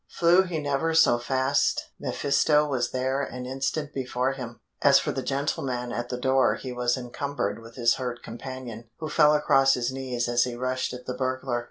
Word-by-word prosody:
Flew 175 +2 +4
he 180 -3 -3
never 150 +2 -1
so 160 -7 +5
fast 130 +3 0
mephisto 150 +2 +2
was 125 -4 -1
there 130 +2 -1
an 125 -2 -5
instant 135 +3 -3
before 130 0 -1
him. 125 -3 -7 0.2
As 140 -1 +6
for - - 0
the 135 - -3
gentleman 130 -3 -2
at 120 0 -4
the 125 - -3
door 130 +1 +2
he 130 -2 -6
was 125 +1 0
encumbered 125 -2 -3
with 115 0 -13
his 120 -2 +3
hurt 125 -2 -5
companion, 120 -2 -8
who 155 -1 -5
fell 150 -1 +5
across 135 -2 +4
his 125 0 -1
knees 130 -2 -3
as 120 0 +3
he 125 -1 -3
rushed 130 +1 -2
at 125 0 -8
the 125 - -3
burglar. 130 -1 -2
130 Hz, 190 wpm, -26 LUFS, 125-140 Hz, 0.2 s, As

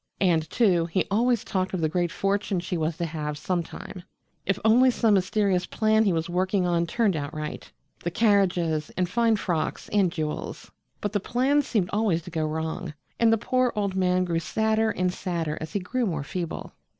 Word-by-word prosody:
And, 165 -4 +2
too, 180 -8 +3
he 175 +3 0
always 235 +2 +2
talked 190 0 -1
of 175 - -2
the 160 - +2
great 175 +2 0
fortune 195 -1 0
she 180 +1 -3
was 160 -1 -1
to 170 - -1
have 150 -2 -4
sometime 175 +2 -4 0.5
if 195 - +2
only 245 +4 +6
some 230 -3 +2
mysterious 190 -1 +1
plan 220 0 +2
he 195 - +3
was 165 -1 -1
working 185 +2 +1
on 170 -1 +1
turned 205 0 +1
out 145 -1 -3
right 155 0 -6 0.3
the 175 - 0
carriages 175 -6 +2
and 180 -1 +1
fine 230 +4 +2
frocks 175 -6 -2
and 195 -4 +2
jewels. 155 -3 -4 0.3
But 205 0 -2
the 205 - +2
plan 260 +8 +2
seemed 210 -9 -1
always 205 -6 +1
to 175 - -10
go 160 -2 -1
wrong, 160 +1 -4 0.2
and 230 -1 +5
the 225 - +4
poor 255 +3 +1
old 200 -2 -1
man 185 -1 +2
grew 170 -2 0
sadder 220 +5 +1
and 180 -3 0
sadder 165 -5 -2
as 160 - -6
he 205 - +1
grew 235 +6 -1
more 160 -6 -2
feeble. 170 +3 -5
185 Hz, 195 wpm, -26 LUFS, 165-215 Hz, 0.5 s, only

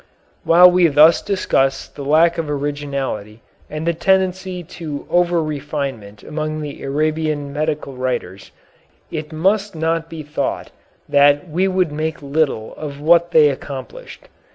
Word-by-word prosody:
While 180 +2 +7
we 180 -1 +4
thus 155 +2 +5
discuss 135 -9 0
the - - -11
lack 165 +4 +3
of 160 -2 -3
originality 140 -7 -4 0.3
and 155 +1 -5
the 170 - +1
tendency 185 +1 0
to 155 -3 -7
over 175 -1 +2
refinement 140 -8 -5
among 155 0 -4
the 145 -2 -7
Arabian 150 0 -1
medical 150 -2 -2
writers, 120 -7 -4 0.6
it 155 -1 -5
must 195 +5 0
not 165 +1 -1
be 160 -2 -7
thought 145 -2 -3 0.4
that 145 +3 +4
we 175 +4 0
would 185 -4 0
make 155 0 -4
little 140 -6 -1
of 145 -2 -7
what 170 +3 +4
they 155 -3 +5
accomplished. 140 - -8
155 Hz, 135 wpm, -19 LUFS, 140-170 Hz, 0.6 s, While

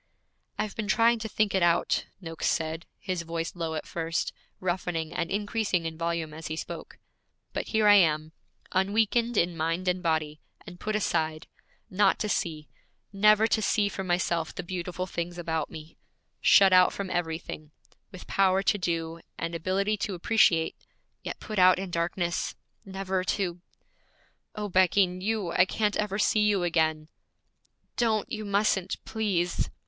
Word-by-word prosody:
'I've 215 - -3
been 215 - -3
trying 230 +1 +4
to 220 0 -5
think 215 -1 +1
it 190 - +2
out,' 170 -1 +2
Noakes 165 -3 -4
said, 160 0 -1
his 185 -3 -3
voice 165 0 -4
low 165 -2 -3
at 155 - -4
first, 165 0 -2 0.3
roughening 175 -3 -2
and 170 -1 -2
increasing 205 -3 -1
in 160 0 -3
volume 165 -1 -2
as 160 +1 -7
he 155 - -3
spoke, - - -7 0.6
'but - - -3
here 220 -2 +2
I 205 0 +8
am, 155 -4 +2 0.4
unweakened 220 +4 +1
in 170 0 +2
mind 165 +3 -1
and 180 0 +1
body, 155 -3 -1 0.2
and 175 -3 -11
put 215 0 -2
aside 160 -6 -1 0.4
Not 195 0 +3
to 215 - -2
see, 155 -6 -2 0.5
never 210 +2 +5
to 225 -1 +1
see 205 0 +2
for 190 - -5
myself 175 -2 -1
the - - -4
beautiful 180 0 -4
things 175 -1 -4
about 160 -3 -2
me; 155 0 -11 0.4
shut 195 -2 +6
out 185 0 +6
from 195 -2 -5
everything; 160 -3 -3 0.4
with 185 - -10
power 190 0 +2
to 205 - +2
do, 165 -2 -2 0.2
and 165 0 -3
ability 195 +5 0
to 195 -1 -3
appreciate, 175 -4 +3 0.5
yet - - -6
put 215 -3 -4
out 185 0 +7
in 190 -1 -5
darkness; 170 +1 -1 0.3
never 190 -1 -2
to 180 -3 -1 0.9
O 210 -1 -3
Becky, 185 +1 +4
you, 185 +1 -2
I 185 - +4
can't 210 +1 0
ever 205 -2 -1
see 215 0 +3
you 205 -3 +2
again!' 160 -2 +1 0.9
'Don't! 220 -3 +1
You 215 -1 -4
mustn't, 200 -2 +1
please!' 195 -6 -1
180 Hz, 160 wpm, -28 LUFS, 165-205 Hz, 0.9 s, I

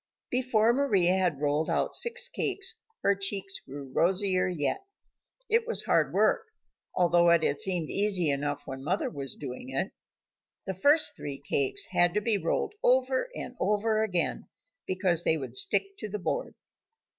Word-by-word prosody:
Before 240 -3 +2
Mari 245 -9 +2
had 180 -5 +2
rolled 150 +2 0
out - - 0
six 480 +1 +3
cakes, 395 -4 -1 0.3
her 200 - +4
cheeks 195 0 -1
grew 135 -1 -10
rosier 185 +1 +2
yet. 180 - -2 0.6
It 455 +1 +1
was 470 - +1
hard - - +2
work, 450 -2 +2 0.5
although 175 -1 +4
it 170 -1 +4
had 140 - 0
seemed 180 -5 +1
easy 195 -6 +1
enough 145 +1 -3
when 135 0 -7
mother 180 +7 -1
was 140 -3 -4
doing 125 0 -8
it. 135 +8 -2 0.7
The 190 - -3
first 290 - +3
three 140 -1 -6
cakes 140 -1 0
had 175 +1 +3
to - - +3
be 210 -1 0
rolled 165 - -1
over 260 - +2
and 250 - -6
over 215 +2 +1
again 180 -7 -1 0.4
because 185 -3 +1
they 160 - +2
would 140 - -7
stick 395 0 +2
to 215 - -5
the 210 - -3
board. - - -3
190 Hz, 160 wpm, -28 LUFS, 160-240 Hz, 0.7 s, her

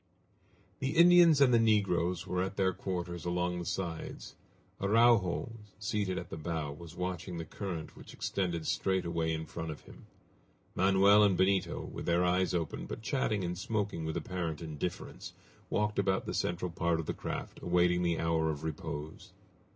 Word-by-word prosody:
The 135 +3 -2
Indians 170 -3 +7
and 130 -3 +6
the 115 - +6
negroes 95 -5 +2
were 90 -1 -1
at 95 +2 -3
their 95 -1 +2
quarters 90 -2 -4
along 90 0 -1
the 85 - -5
sides. 85 -3 -4 0.5
Araujo, 115 +1 +3 0.3
seated 100 -2 -1
at - - -6
the - - -5
bow, 80 -2 -3
was 80 +3 -10
watching 90 -1 -4
the 80 - -4
current 85 -3 -6
which - - -12
extended 85 -4 -2
straight 95 -1 0
away 85 -1 -1
in 80 0 -3
front 80 0 -6
of 75 - -7
him. - - -15 0.7
Manoel 100 +2 +5
and 100 -3 +4
Benito, 95 0 +1
with - - -7
their 85 +1 +3
eyes 90 +1 +2
open, 85 -3 -3
but 110 - -7
chatting 110 -6 0
and 90 0 -2
smoking 105 -2 -2
with 80 +1 -2
apparent 85 -2 -3
indifference, 80 +2 -5 0.4
walked 105 0 0
about 95 -1 +1
the - - -4
central 90 0 -1
part 85 -1 0
of 80 - -3
the - - -2
craft - - -5
awaiting 90 0 +2
the 85 -2 +1
hour 80 -1 +1
of 75 -1 -4
repose. 75 -1 -6
90 Hz, 170 wpm, -32 LUFS, 85-100 Hz, 0.7 s, Indians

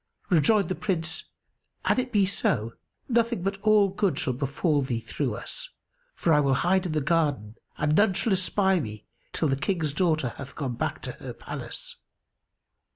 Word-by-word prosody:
Rejoined 190 +5 +4
the 185 - -1
Prince, 165 -5 -2 0.6
"An - - +3
it 255 0 -2
be 205 -3 +4
so, 115 - 0 0.3
nothing 235 -5 +1
but 195 +1 -2
all 215 -1 +5
good 190 -5 0
shall 130 - 0
befal 140 +4 0
thee 130 -4 -1
through 120 0 -3
us; - - -7 0.5
for 165 - +2
I 150 - +5
will 140 -2 +3
hide 185 +6 +2
in 160 - -3
the 155 - +1
garden 145 - +1 0.2
and 150 0 +1
none 205 0 +4
shall 210 +2 +1
espy 190 0 +2
me, 105 -6 -6 0.3
till 160 - 0
the 135 - +2
King's 155 0 -1
daughter 155 -5 +1
hath 140 0 -8
gone 135 -5 -3
back - - -3
to - - -3
her - - -8
palace." - - -7
160 Hz, 175 wpm, -27 LUFS, 140-195 Hz, 0.6 s, all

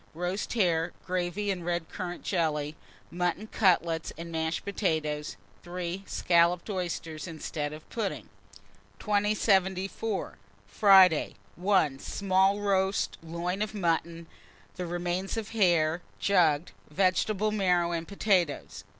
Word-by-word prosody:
Roast 180 +4 -3
hare, 175 -6 +1
gravy, 185 +3 -1
and 180 -3 -4
red 175 -1 -2
currant 175 -2 -6
jelly; 155 -4 -1 0.4
mutton 180 +3 -1
cutlets 170 -6 +1
and 170 0 -7
mashed 160 0 -2
potatoes. 155 -7 -2 0.2
3. 180 +1 -5
Scalloped 170 +3 +2
oysters, 170 -3 -4
instead 155 -2 -4
of 155 +1 -10
pudding. 220 -4 -3 0.7
2074. 200 -1 0 0.3
Friday. 190 - +5 0.2
1. 180 -7 +2
Small 195 +3 +1
roast 195 -1 0
loin 170 +4 -3
of 215 0 -2
mutton; 170 -2 -1 0.5
the 180 -1 -4
remains 175 +4 -2
of 220 -1 -4
hare, 175 -6 +2 0.2
jugged; 170 -5 +2 0.2
vegetable 195 +5 +1
marrow 180 -4 +2
and 165 -1 -3
potatoes. 190 -6 0
180 Hz, 110 wpm, -28 LUFS, 165-195 Hz, 0.7 s, Friday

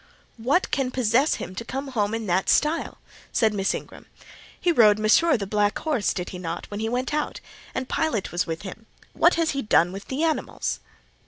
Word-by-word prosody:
"What 270 +11 +1
can 270 -3 0
possess 255 +3 +2
him 185 - -6
to 205 - -5
come 270 +3 -5
home 215 -4 0
in 225 -1 -4
that 185 0 +1
style?" 310 +3 +1 0.3
said 220 -2 +2
Miss 195 -1 0
Ingram. - - -9 0.5
"He 355 - +2
rode 215 -9 +6
Mesrour 225 +9 +4
(the 200 - -4
black 205 +1 +1
horse), 295 -10 0
did 180 -1 -4
he 180 - -7
not, 170 -1 -4
when 205 - -4
he 220 +1 -1
went 250 +4 -2
out? 300 0 -2 0.4
and 260 - -2
Pilot 295 -12 -1
was 175 - -1
with 165 +1 -4
him:—what 225 - -1
has 330 -1 +1
he 275 - -2
done 175 -6 +3
with 195 +1 -8
the 270 +4 -2
animals?" 320 -2 -1
225 Hz, 195 wpm, -25 LUFS, 205-280 Hz, 0.5 s, rode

